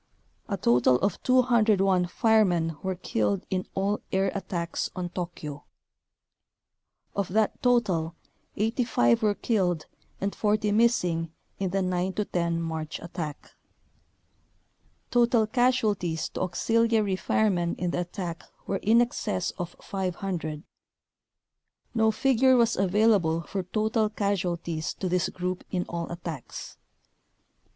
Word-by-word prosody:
A 200 - -1
total 125 -4 +4
of 200 - 0
201 215 -8 +3
firemen 180 -6 +2
were 190 -1 -2
killed 105 - -1
in 185 -1 -1
all 200 +2 0
air 190 0 +1
attacks 175 -3 -3
on 180 -1 -3
Tokyo. 165 -5 -6 1.5
Of 200 -2 0
that 215 +3 0
total 190 -10 +2 0.4
85 220 - +2
were 210 -1 +2
killed 180 -9 0 0.3
and 200 +1 -1
40 210 0 +1
missing 180 -8 +2 0.3
in 195 -1 0
the 195 +1 0
9 185 +1 -1
10 170 -4 -1
March 160 -1 -4
attack. 160 -3 -6 1.6
Total 240 -2 +4
casualties 215 -8 +1
to - - -6
auxil 225 +6 +1
iary 210 -4 +2
firemen 175 -4 +1
in 175 -1 -2
the - - -1
attack 175 -2 -5 0.2
were 195 - -1
in 225 +5 +4
excess 210 -6 -1
of 175 -1 -4
500. 180 -5 -3 1.3
No 220 -2 +3
figure 260 +3 +4
was 235 -1 +3
available 190 -4 +3
for 195 +4 -3
total 215 +3 0
casualties 175 -6 -2
to 190 - -3
this 180 0 +1
group 180 0 -4
in 180 -1 -1
all 170 0 -4
attacks. 170 -6 -7
190 Hz, 120 wpm, -27 LUFS, 170-215 Hz, 1.6 s, total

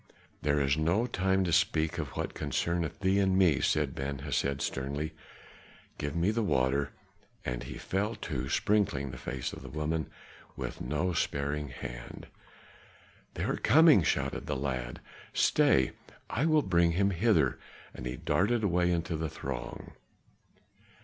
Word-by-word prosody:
"This 75 0 +2
is 70 - +3
no 85 +9 +2
time 95 -4 +1
to 85 -3 0
speak 80 -3 +2
of - - -2
what - - -2
concerneth 85 +2 -2
thee 95 +1 +3
and 95 -1 +3
me," 90 -7 +4
said 75 -3 +1
Ben 70 +1 -3
Hesed 70 0 -1
sternly. 70 +4 -3 0.9
"Give 75 +1 -3
me 85 +5 +2
the 115 +1 0
water!" 70 -6 +1 0.5
And 60 -1 -2
he - - -7
fell 105 +4 -1
to 65 -5 -4
sprinkling 75 -11 +1
the 65 - -9
face 65 0 -4
of - - -8
the 65 - -9
woman 75 +2 -2 0.5
with - - -5
no 90 +5 -1
sparing 70 -1 -1
hand. - - -8 1.1
"They - - -2
are - - 0
coming!" 155 - +6
shouted - - -1
the - - -1
lad. 65 -3 -3 0.3
"Stay! 65 -1 +4 0.4
I 140 +8 +1
will 155 -2 +4
bring 85 -2 +3
him 100 +3 +2
hither," 85 - +2 0.3
and 60 - -6
he 60 +1 -4
darted 110 - +1
away 90 -2 +2
into 85 -1 -1
the 80 0 -2
throng. 65 -3 -6
80 Hz, 150 wpm, -30 LUFS, 70-95 Hz, 1.1 s, coming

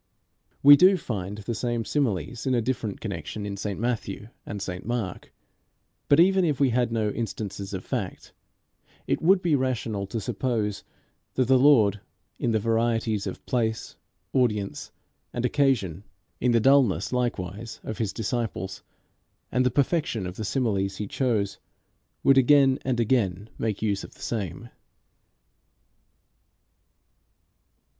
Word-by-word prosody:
We 145 +1 +11
do 185 +5 +6
find 100 - -4
the 105 +3 -4
same 120 0 -2
similes 115 - -1
in 130 - +2
a 120 - +2
different 115 -4 -2
connection 100 +1 -5
in 100 -1 -4
St 100 0 -4
Matthew 110 -3 -3 0.2
and 100 - -5
St 90 -2 -5
Mark; 115 -5 -4 0.8
but 140 - +6
even 190 +2 +5
if 150 -6 0
we 135 -3 +3
had 120 -1 +1
no 110 -2 0
instances 100 -4 -5
of 95 -2 -5
fact, - - -4 0.7
it - - -1
would 185 +3 +4
be 165 -4 +3
rational 120 -6 -1
to 115 - -3
suppose 105 -2 -2 0.5
that 130 -2 +2
the 130 0 +5
Lord, 110 -8 +5 0.4
in 120 - 0
the 110 - +2
varieties 115 -1 0
of - - -7
place, 110 -4 -1 0.4
audience, 105 -6 0 0.4
and 120 - -1
occasion, 125 - +1 0.4
in 125 - +2
the 115 - +4
dullness 130 -3 +3
likewise 110 -3 -3
of 110 - -6
his 110 -4 0
disciples, 110 -3 -3 0.7
and 125 +1 +2
the 125 - +3
perfection 140 - 0
of 90 0 -6
the 110 - -5
similes 100 -5 -1
he 105 - -3
chose, 105 -4 -1 0.6
would 135 -1 +6
again 135 0 +5
and 125 -2 -1
again 105 -4 0
make 110 -2 -2
use 100 -3 0
of - - -11
the - - -18
same. 100 -8 -4
115 Hz, 140 wpm, -26 LUFS, 100-130 Hz, 0.8 s, We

